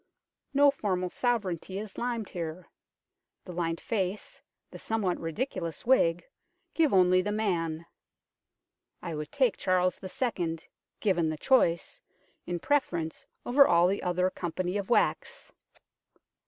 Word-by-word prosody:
No 285 0 +5
formal 185 -8 -2
sovereignty 195 -7 -1
is 205 -1 -6
limned 235 -3 -3
here; 170 0 -6 0.8
the 180 - -7
lined 165 -1 -2
face, 195 -2 -3 0.3
the - - -10
somewhat 205 -5 -1
ridiculous 170 - -4
wig, 175 -9 +3 0.5
give 320 -3 +3
only 185 -1 +5
the 205 +3 -2
man. 170 -6 -1 1.2
I 170 - -4
would 150 -1 -5
take 260 -6 +2
Charles 185 -1 +1
II., 185 -5 -2 0.4
given 175 -6 +2
the 155 - -3
choice, 170 - +2 0.5
in 175 0 -2
preference 175 - -1 0.2
over 275 +3 +6
all 170 0 +5
the 195 +2 +1
other 180 +1 +1
company 180 +2 -3
of 195 - -6
wax. 240 - 0
185 Hz, 125 wpm, -29 LUFS, 170-220 Hz, 1.2 s, over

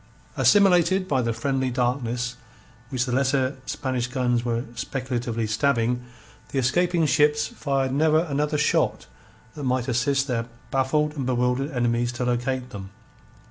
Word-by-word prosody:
Assimilated 190 -2 +4
by 135 -6 +1
the 115 -1 0
friendly 130 +3 -1
darkness 125 0 -1 0.5
which 130 -3 -1
the 125 - -4
lesser 130 +1 +1
Spanish 130 -3 -2
guns 125 -2 0
were 120 -1 -1
speculatively 120 -2 -3
stabbing, 120 +1 +1 0.5
the - - -4
escaping 170 +6 +2
ships 150 +1 +3
fired 135 -2 -1
never 155 +2 +3
another 150 -2 -1
shot 150 - +1 0.5
that 145 - -7
might 130 -2 0
assist 135 +2 +1
their 115 -4 -2 0.2
baffled 150 +3 +1
and 135 -4 -3
bewildered 125 +2 0
enemies 120 -3 0
to 125 +1 -3
locate 125 +1 -1
them. 95 -3 -8
130 Hz, 140 wpm, -24 LUFS, 120-145 Hz, 0.5 s, Assimilated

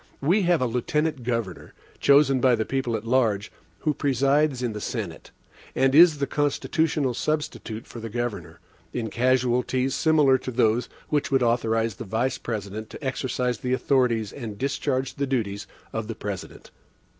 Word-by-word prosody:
We 175 +9 +2
have 170 -7 +3
a - - +2
Lieutenant 140 +5 -1
Governor, 115 -7 -4 0.2
chosen 140 -2 +4
by 125 -1 +5
the 110 -1 -2
people 130 -4 -1
at 110 0 -5
large, 115 -4 +1 0.3
who 155 - +1
presides 140 0 +1
in 120 -3 -1
the 105 - -6
Senate, - - -5 0.5
and 135 0 +3
is 160 0 +7
the 140 - 0
constitutional 145 0 0
substitute 130 -5 -3
for 120 - -10
the 115 0 -6
Governor, 120 0 -4 0.3
in 115 -3 -3
casualties 125 +1 +1
similar 150 -5 +4
to - - -6
those 115 0 +1 0.2
which 145 -1 0
would 135 -2 +2
authorize 115 -3 +1
the - - -5
Vice 120 +6 -1
President 110 -1 -5
to - - -10
exercise 125 -2 -1
the 125 0 -1
authorities 125 -5 +1
and 115 -7 -7
discharge 130 0 -1
the 140 0 -2
duties 105 -6 -2 0.3
of 110 -1 -3
the 115 - -5
President. 100 -3 -7
125 Hz, 160 wpm, -25 LUFS, 115-140 Hz, 0.5 s, is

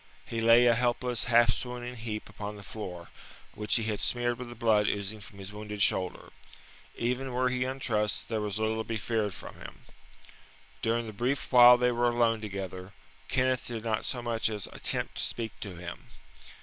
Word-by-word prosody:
He 115 -1 -3
lay 115 +2 +7
a 120 - +6
helpless, 120 0 0
half 120 -2 +5
swooning 125 0 -5
heap 110 -2 -5
upon 105 0 -6
the 100 - -11
floor, 90 -5 -7 0.4
which 105 0 +1
he 115 - +2
had 105 -2 -2
smeared 120 0 0
with 125 -1 -6
the 120 - -9
blood 110 -3 +3
oozing 100 +2 -2
from 100 - -13
his 100 +1 -8
wounded 105 0 -7
shoulder. 90 -1 +1 0.6
Even 125 +2 -1
were 125 +1 +2
he 125 0 0
untrussed, 115 -6 -1
there 110 -2 -1
was 105 -1 -2
little 110 0 0
to - - -1
be 115 0 -3
feared 105 -2 -1
from - - -9
him. - - -11 1.0
During 115 +1 0
the 110 - -7
brief 125 +6 -1
while 125 -1 +9
they 125 0 +2
were 120 0 +2
alone 115 -2 +2
together, 95 -2 -6 0.3
Kenneth 130 -1 +1
did 115 -2 -5
not 110 -2 -1
so 120 -2 -3
much 115 -1 0
as 105 -3 -4
attempt - - -1
to - - +1
speak 115 -2 -3
to 100 -4 -6
him. 85 0 -8
115 Hz, 190 wpm, -29 LUFS, 105-120 Hz, 1.0 s, while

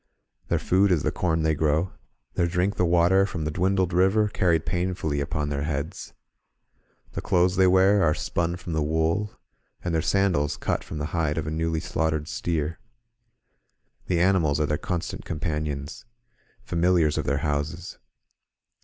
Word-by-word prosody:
Their - - +1
food 95 +2 +2
is 85 -4 +2
the - - +1
corn 80 -3 0
they 80 0 +2
grow; 80 +4 +1 0.4
their 85 - +1
drink 90 +4 0
the 90 - +1
water 90 +3 +4
frcmi 85 -5 -4
the 75 - -1
dwindled 95 +2 +1
river, 95 +4 +3
carried 85 -5 +1
painfully 90 -5 -1
upon 75 +1 -2
their 70 -1 -2
heads; 75 0 -4 1.0
the - - -5
clothes 90 +1 +2
they 95 0 +5
wear 95 +2 +4
are 75 -3 +3
spun 85 0 -1
from 90 -2 -6
the 80 - 0
wool, 80 +7 0 0.5
and 90 - -2
their 80 - +2
sandals 90 -6 +1
cut - - -2
from 80 - -7
the 75 - -2
hide 80 -3 0
of 80 - -2
a 75 - -3
newly 80 0 -1
slaughtered 80 -1 -1
steer. 80 -2 -2 1.3
The 85 - +1
animals 85 -5 +2
are 75 - +2
their 75 0 -1
constant 90 -7 -4
companions, 75 -3 -4 0.6
familiars 85 -3 +2
of - - -3
their 70 - +1
houses. 75 +4 -3
85 Hz, 160 wpm, -25 LUFS, 75-90 Hz, 1.3 s, they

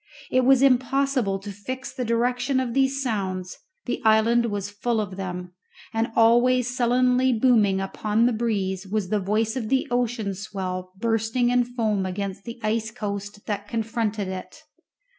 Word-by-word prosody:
It 255 0 +3
was 265 0 +5
impossible 260 -4 +2
to 200 +1 -8
fix 255 +7 -6
the 260 - -3
direction 245 +3 +1
of 250 -3 -2
these 270 +1 +1
sounds, 190 -6 -3 0.3
the 245 - -3
island 225 +2 +4
was 205 -2 -3
full 225 +2 -1
of 200 -3 -3
them; 180 -2 -5 0.4
and 225 +1 0
always 245 +2 +4
sullenly 250 +1 +3
booming 220 -5 +3
upon 210 +3 0
the 245 - +2
breeze 200 -4 -1
was 200 -2 -2
the 210 - +1
voice 215 +3 0
of 230 -5 -3
the 265 -1 +1
ocean 235 -4 0
swell 185 -2 -5
bursting 225 +3 +1
in 245 0 +4
foam 220 -5 -1
against 195 +1 -4
the 235 +1 -7
ice 220 +1 0
coast 205 -2 -6
that 205 -1 -3
confronted 225 -2 -2
it. 185 -1 -7
225 Hz, 160 wpm, -24 LUFS, 200-245 Hz, 0.4 s, was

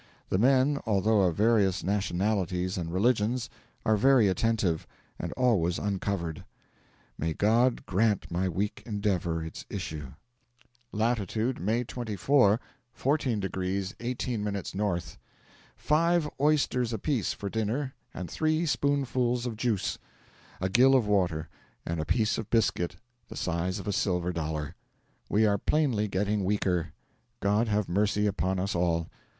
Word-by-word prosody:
The 95 - +1
men, 135 +4 +4
although 105 0 +3
of 90 -4 +2
various 105 -4 +3
nationalities 95 -2 0
and 85 -2 -3
religions, 115 +4 +1 0.3
are 110 - +4
very 125 0 +5
attentive, 95 -4 0 0.3
and - - -4
always 100 -9 +2
uncovered. 95 -5 -2 0.8
May 80 0 -1
God 115 +4 +2
grant 105 +1 +1
my 90 +2 0
weak 100 +4 -2
endeavour 95 -6 -1
its 80 - -7
issue! 75 -4 -5 0.8
Latitude, 110 +2 0
May 110 +7 0
24, 120 -1 +2 0.3
14 135 -5 0
degrees 95 0 -2
18 120 -2 -2
minutes 100 -3 -3
N. 95 -2 0 0.8
Five 165 +1 +2
oysters 135 -5 +2
apiece 115 +1 -1
for 100 - -6
dinner 110 +6 -2 0.2
and 90 - -6
three 155 - 0
spoonfuls 125 -3 0
of 120 -3 -3
juice, 110 -2 -1 0.6
a 95 - 0
gill 125 +7 +5
of 125 -4 +3
water, 90 -6 +1 0.4
and 85 -1 -2
a - - -3
piece 110 - +1
of 110 - -6
biscuit 90 -7 +1 0.3
the - - -8
size 90 +2 -1
of 95 - -7
a 100 - 0
silver 90 -2 0
dollar. 80 -1 -3 0.6
'We 110 +2 +3
are 100 -1 +3
plainly 130 -8 +1
getting 100 +1 0
weaker 95 -4 0 0.5
God 105 +4 +2
have 105 -2 0
mercy 105 +3 +1
upon 95 -2 0
us 95 +2 -1
all!' 85 -1 0
105 Hz, 135 wpm, -28 LUFS, 90-120 Hz, 0.8 s, very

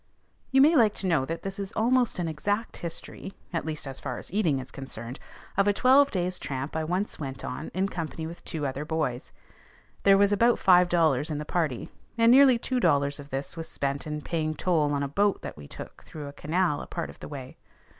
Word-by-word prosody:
You 265 0 +5
may 310 +4 +6
like 220 -7 +4
to - - -4
know 160 -7 +2
that 165 +4 -5
this 195 0 -4
is 195 0 -3
almost 245 +2 +2
an 175 -2 -1
exact 205 +9 -2
history, 175 +3 -6 0.2
at 165 - -2
least 155 -1 -3
as 135 -1 -6
far - - -4
as - - -9
eating 175 -9 +2
is 130 -1 -7
concerned, 130 -2 -6 0.4
of 195 +1 +3
a 205 - +4
twelve 265 +5 +5
days' 180 -3 -1
tramp 135 +2 -4
I 160 - 0
once 180 +6 -2
went 135 -3 -5
on 140 +5 -5
in 190 +1 +1
company 165 -3 -5
with 170 +2 -8
two 155 -3 -4
other 135 +1 -3
boys. 150 -6 -2 0.7
There 195 0 +6
was 200 0 +4
about 230 +4 +4
five 180 -2 +5
dollars 160 -5 +2
in 150 - -2
the 150 - -4
party, 155 -7 -1 0.3
and 230 0 +6
nearly 265 -1 +7
two 255 +2 -1
dollars 140 -7 +2
of 145 0 -10
this 135 +1 -4
was 165 -1 -5
spent 140 +1 -2
in 150 0 -4
paying 155 -1 -2
toll 155 -5 +1
on 140 -1 0
a - - -1
boat 200 +8 +1
that - - -6
we 75 -1 -11
took - - -10
through 150 -2 -8
a 140 - -8
canal 160 +2 0
a - - -8
part - - -4
of - - -19
the - - -8
way. 135 -3 -8
165 Hz, 225 wpm, -27 LUFS, 145-200 Hz, 0.7 s, nearly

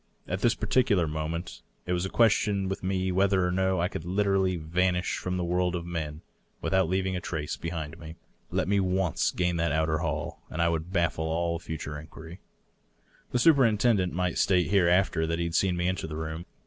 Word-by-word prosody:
At 95 +2 -3
this 120 -1 +3
particular 100 -10 +2
moment 80 +3 -4 0.2
it 90 - -1
was 90 +1 0
a - - -7
question 105 -3 +2
with 95 - -3
me 95 0 0
whether 95 0 +2
or 90 - 0
no 95 0 +1
I 85 - +2
could 85 - -6
literally 95 0 +1
vanish 90 +3 0
from 90 0 -3
the 90 - -1
world 90 +1 0
of 85 -1 -4
men 80 -3 -4 0.4
without 95 -3 +1
leaving 95 0 0
a 90 - -3
trace 75 -3 -3
behind 80 -1 -5
me. 80 0 -9 0.3
Let - - -1
me 100 0 +2
once 95 -3 +1
gain 90 -1 0
that 85 -2 +1
outer 80 0 +1
hall, 80 +1 -3
and 80 - -6
I 85 0 +3
would 85 +1 -2
baffle 85 -3 0
all 85 +1 -1
future 75 -3 -6
inquiry. 80 +2 -11 0.9
The - - +1
superintendent 115 - +4
might 90 0 -1
state 90 -2 +2
hereafter 90 -3 +3
that 80 0 -1
he 85 - -1
had 85 - -4
seen 90 +1 +2
me 90 0 0
enter 95 -3 -2
the 75 - -6
room. 80 +2 -5
90 Hz, 200 wpm, -28 LUFS, 80-95 Hz, 0.9 s, superintendent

